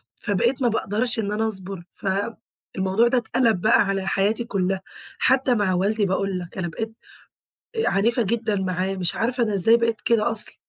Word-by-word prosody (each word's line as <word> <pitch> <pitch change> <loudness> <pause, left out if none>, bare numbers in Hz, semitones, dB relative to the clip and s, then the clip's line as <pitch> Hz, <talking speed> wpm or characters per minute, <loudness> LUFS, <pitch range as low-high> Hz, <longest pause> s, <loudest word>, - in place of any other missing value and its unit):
فبقيت 240 +7 0
ما 245 - +3
باقدرش 225 +2 0
إن 205 -1 -1
أنا 220 +1 0
أصبُر، 190 -3 -4
فالموضوع 195 +1 -2
ده 250 - +2
اتقلب 230 -5 +1
بقى 220 - +5
على 195 -1 -1
حياتي 205 +5 +1
كُلّها، 190 -3 -1 0.4
حتى 260 -1 +3
مع 200 -3 +1
والدي، 205 +3 +1
باقول 190 0 -1
لك 175 0 -10
أنا 175 -2 -2
بقيت 220 +6 -5 0.8
آآ، 445 - +1
عنيفة 230 +5 +2
جدًا 220 0 -1
معاه، 190 0 -1
مش 180 -2 0
عارفة 245 +1 0
أنا 215 -3 0
إزاي 225 +5 +5
بقيت 230 -1 0
كده 230 0 +2
أصلًا! 215 - -4
210 Hz, 175 wpm, -23 LUFS, 190-230 Hz, 0.8 s, بقى